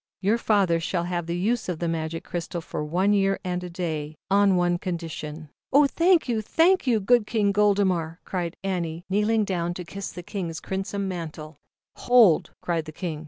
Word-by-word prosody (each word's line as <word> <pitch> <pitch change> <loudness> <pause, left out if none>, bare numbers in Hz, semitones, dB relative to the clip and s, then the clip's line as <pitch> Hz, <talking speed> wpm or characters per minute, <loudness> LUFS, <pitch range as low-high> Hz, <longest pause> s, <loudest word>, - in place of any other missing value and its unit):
"Your 210 +4 +1
father 195 -7 +2
shall 170 +1 -1
have 175 -1 -3
the 170 +1 -2
use 220 +4 0
of 175 - -2
the 170 - -2
Magic 165 0 -3
Crystal 175 0 -4
for 160 - -5
one 180 +7 +1
year 195 -1 +2
and 180 -1 -3
day, 155 -4 -4 0.2
on 200 -1 +4
one 175 -1 +1
condition 160 -3 -5 0.2
"Oh, 285 +2 +6
thank 335 +3 +3
you! 230 -3 0
thank 340 - +3
King 220 -2 +2
Goldemar," 190 -5 +2
cried 175 -2 -3
V - - -3
a 190 -1 0
ood 175 - -1
kneelin 165 0 -6
ZAUBERLINDA, - - -36
THE 205 +2 +3
WISE 225 - +3
WITCH. - - +1
down 175 -3 -1
to 180 - -5
kiss 195 +3 -6
the 175 - -8
King's 170 -4 -4
crimson 195 +1 -3
mantle. 160 -4 -6 0.4
"Hold!" 235 -10 +5
cried 165 -3 -1
the 155 - -8
King. 160 -1 -5
180 Hz, 200 wpm, -25 LUFS, 165-205 Hz, 0.4 s, Oh